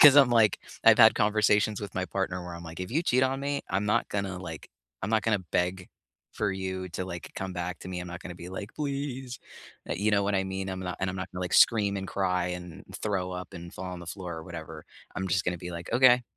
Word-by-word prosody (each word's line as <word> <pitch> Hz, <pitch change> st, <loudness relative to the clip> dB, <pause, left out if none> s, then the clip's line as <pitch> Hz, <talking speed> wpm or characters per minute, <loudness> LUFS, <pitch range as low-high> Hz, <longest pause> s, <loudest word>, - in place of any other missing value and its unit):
'Cause 145 Hz, -1 st, +10 dB
I'm, 135 Hz, -3 st, +8 dB
like 115 Hz, -3 st, +5 dB, 0.3 s
I've -, -, +8 dB
had -, -, +9 dB
conversations 105 Hz, 0 st, +3 dB
with 100 Hz, -2 st, -6 dB
my 95 Hz, 0 st, 0 dB
partner, 95 Hz, -2 st, -2 dB
where 85 Hz, -1 st, -6 dB
I'm 85 Hz, 0 st, -8 dB
like, 80 Hz, +2 st, -8 dB
"If 90 Hz, -, -4 dB
you 160 Hz, +6 st, +1 dB
cheat 130 Hz, -4 st, +3 dB
on 135 Hz, +1 st, +2 dB
me, 140 Hz, 0 st, -1 dB
I'm 100 Hz, +3 st, 0 dB
not 110 Hz, +3 st, +2 dB
gonna, 100 Hz, -2 st, -2 dB
like, 80 Hz, -4 st, -7 dB, 0.3 s
I'm 110 Hz, -, -2 dB
not 110 Hz, -1 st, +3 dB
gonna 105 Hz, -4 st, +2 dB
beg 90 Hz, +1 st, 0 dB, 0.4 s
for 105 Hz, -2 st, 0 dB
you 95 Hz, -1 st, -3 dB
to, 90 Hz, +2 st, -3 dB
like, 85 Hz, -2 st, -6 dB
come 95 Hz, -1 st, -3 dB
back 90 Hz, 0 st, -3 dB
to -, -, -8 dB
me. 90 Hz, -1 st, -3 dB
I'm 90 Hz, -, -6 dB
not 85 Hz, +1 st, -7 dB
gonna 90 Hz, -, -7 dB
be 85 Hz, +1 st, -8 dB
like, 100 Hz, +3 st, -6 dB
'please.'" 135 Hz, -4 st, -3 dB, 0.5 s
Uh, -, -, 0 dB
you 105 Hz, +3 st, +2 dB
know 100 Hz, 0 st, +4 dB
what 100 Hz, 0 st, +1 dB
I 95 Hz, 0 st, +2 dB
mean? 95 Hz, 0 st, -3 dB
I'm 95 Hz, 0 st, -4 dB
not 90 Hz, -1 st, -4 dB
and 95 Hz, -, 0 dB
I'm -, -, -6 dB
not 95 Hz, 0 st, -4 dB
gonna, 90 Hz, 0 st, -4 dB
like, 90 Hz, -, -3 dB
scream, 100 Hz, -4 st, +5 dB
and 95 Hz, -1 st, -4 dB
cry, 90 Hz, -2 st, 0 dB
and 90 Hz, 0 st, -6 dB, 0.2 s
throw 95 Hz, -3 st, -1 dB
up, 90 Hz, 0 st, -6 dB
and 85 Hz, 0 st, -8 dB
fall 95 Hz, -, -6 dB
on 90 Hz, -, -7 dB
the 85 Hz, -, -10 dB
floor 90 Hz, -2 st, -5 dB
or -, -, -7 dB
whatever. 80 Hz, -3 st, -8 dB, 0.3 s
I'm 95 Hz, +1 st, -2 dB
just 95 Hz, 0 st, +1 dB
gonna 90 Hz, -1 st, -1 dB
be 90 Hz, 0 st, -6 dB
like, 85 Hz, +5 st, -6 dB
"Okay. 125 Hz, 0 st, +6 dB
95 Hz, 260 wpm, -29 LUFS, 90-105 Hz, 0.5 s, Cause